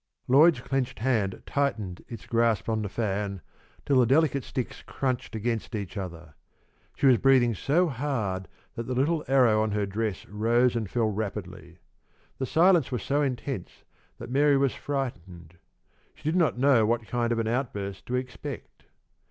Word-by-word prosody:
Lloyd's 145 +1 +5
clenched 135 0 -2
hand 110 -6 -1
tightened 110 -11 -2
its 115 - -9
grasp 115 -5 +1
on 110 -1 0
the 105 - -3
fan 100 -2 -2 0.5
till 135 -2 +3
the 125 - +4
delicate 140 0 +3
sticks 125 -3 -5
crunched 130 -4 -3
against 115 +1 -2
each 100 -3 -5
other. 85 -5 -7 0.6
She - - -1
was 130 -4 +6
breathing 130 -3 +4
so 155 - +1
hard 115 - -2 0.3
that 115 - -6
the 130 - -2
little 150 +5 +1
arrow 125 -5 +4
on 110 -1 -1
her 105 -1 0
dress 105 0 -3
rose 115 +4 +2
and 110 -4 -2
fell 115 -1 0
rapidly. 95 -4 -6 0.6
The 130 - -2
silence 170 -2 +4
was 125 - -2
so 145 +1 +1
intense 130 -6 -4 0.3
that - - -8
Mary 140 +1 +4
was 135 -1 +2
frightened. 90 - -5 0.6
She - - -21
did 155 +3 0
not 170 -8 +2
know 130 -3 +4
what 115 +1 0
kind 120 +1 -1
of 120 - +1
an 115 -1 -1
outburst 105 -6 -3
to 125 - -1
expect. 125 +1 -6
120 Hz, 165 wpm, -27 LUFS, 105-135 Hz, 0.6 s, was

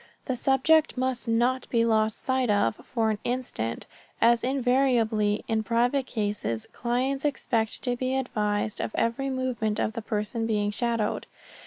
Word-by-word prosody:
The 260 - -1
subject 275 +5 +3
must 255 -1 -1
not 240 +3 +1
be 230 -1 +2
lost 220 -1 +1
sight 260 -2 +1
of 205 - +2
for 225 -3 -1
an 210 - -3
instant, 240 - -3 0.3
as 235 0 +4
invariably, 245 -5 +2
in 220 -1 +1
private 245 +4 +1
cases, 205 - -2
clients 255 +3 -1
expect 230 -6 -1
to 245 -1 +1
be 255 +1 -1
advised 210 -5 -1
of - - -4
every 230 +4 0
movement 250 -5 -1
of 220 - 0
the 230 - -4
person 220 +2 -2
being 205 -2 0
shadowed. 230 -1 -1
235 Hz, 150 wpm, -27 LUFS, 215-255 Hz, 0.3 s, as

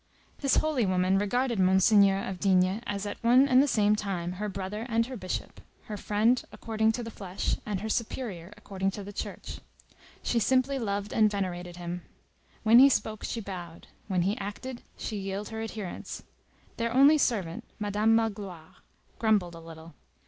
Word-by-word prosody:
This 275 -2 +2
holy 305 -6 +2
woman 185 +1 +2
regarded 235 +2 0
Monseigneur 195 +1 +5
of 190 -1 -5
D—— 190 +2 +2
as 200 0 -3
at 205 - -6
one 250 +4 +6
and 260 -1 +6
the 290 - +2
same 210 -4 +3
time 190 -5 -3
her 210 - -1
brother 195 +4 -5
and 230 0 +2
her 260 +1 -7
bishop, 185 -5 -5 0.2
her 215 - -6
friend 215 +5 +2
according 220 0 0
to 240 - -4
the 230 - -6
flesh 195 -3 -2
and 200 -3 -2
her 220 - -3
superior 215 -5 -3
according 195 -2 -2
to 205 - -5
the 205 +1 -9
Church. - - -6 0.6
She 235 - +1
simply 260 +4 +2
loved 205 -2 -2
and 215 -1 +4
venerated 180 -3 -4
him. 175 0 -5 0.6
When 230 +2 +7
he 275 +2 +9
spoke, 215 -5 -1
she 230 - -3
bowed; 175 -4 -8 0.2
when 185 -4 +1
he 200 +4 +1
acted, 235 +5 -6 0.2
she 215 - -4
yielded 195 +2 -4
her 220 0 -4
adherence. 215 -4 -6 0.5
Their 230 0 -1
only 280 +5 +6
servant, 190 -11 0
Madame 210 +1 +2
Magloire, 200 -7 -3 0.4
grumbled 210 -6 +2
a 165 - -9
little. 165 0 -12
205 Hz, 170 wpm, -28 LUFS, 190-230 Hz, 0.6 s, he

